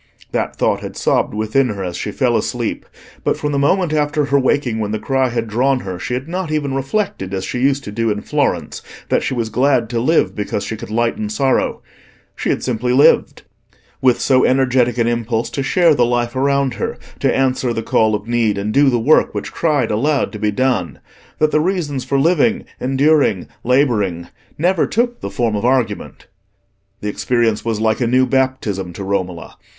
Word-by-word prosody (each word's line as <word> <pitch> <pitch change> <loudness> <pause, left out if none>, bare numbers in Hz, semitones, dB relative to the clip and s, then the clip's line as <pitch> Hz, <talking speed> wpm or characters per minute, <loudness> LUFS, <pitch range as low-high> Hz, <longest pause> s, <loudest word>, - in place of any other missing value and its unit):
That - - -2
thought - - +1
had - - -8
sobbed - - 0
within 110 +5 +1
her 100 -2 -4
as 90 -2 -4
she - - -4
fell - - +1
asleep, - - -2 0.4
but - - 0
from 150 - -2
the 140 - 0
moment 170 +3 +2
after 150 0 +1
her 140 0 +2
waking 130 -4 0
when 105 -2 -2
the 110 - -1
cry 130 +3 0
had 115 -1 -2
drawn 125 +4 +1
her, 95 -2 -6
she 125 - -3
had 130 +3 -5
not 180 -1 -3
even 145 -3 -1
reflected, 135 - -2
as 95 0 -3
she 125 - -3
used 135 +1 +1
to 105 - -7
do 115 +2 -1
in 105 -1 -1
Florence, - - -1 0.3
that - - +2
she - - -2
was 115 -2 -2
glad 125 -1 +1
to 120 - 0
live 155 +8 +2
because 105 -1 -3
she 110 - -4
could 105 - -9
lighten 110 -1 -1
sorrow—she 130 +5 -3
had - - 0
simply 125 0 -1
lived, 135 +3 +3 0.6
with 125 -2 +3
so 130 -2 +3
energetic 130 -2 +2
an 115 - +2
impulse 115 -1 -1
to 140 - -3
share 165 +4 +3
the 125 - +2
life 120 +1 0
around 140 -1 +1
her, - - -4 0.2
to - - +2
answer 130 -2 +1
the 115 -1 -3
call 110 -1 +2
of 105 +1 -6
need 115 -3 +1
and 105 +2 -2
do 140 0 +5
the 120 - +1
work 145 +8 +3
which - - -4
cried 145 -9 0
aloud 140 +7 +1
to 105 - -8
be 105 - +1
done, 115 -5 0 0.4
that 155 0 +2
the 155 - +3
reasons 155 -7 -1
for 140 - 0
living, 220 +10 +2
enduring, 135 - +2 0.2
labouring, 110 -10 +1 0.3
never 175 +2 +2
took 240 +1 -1
the - - -4
form 115 -3 -1
of 100 - -2
argument. 125 -1 -1 0.8
The 105 - -4
experience 115 +1 0
was 115 -2 -2
like 110 +2 +1
a 120 - +2
new 130 +2 +3
baptism 130 -9 -1
to 100 - -6
Romola. 95 -3 -3
125 Hz, 195 wpm, -18 LUFS, 110-140 Hz, 0.8 s, do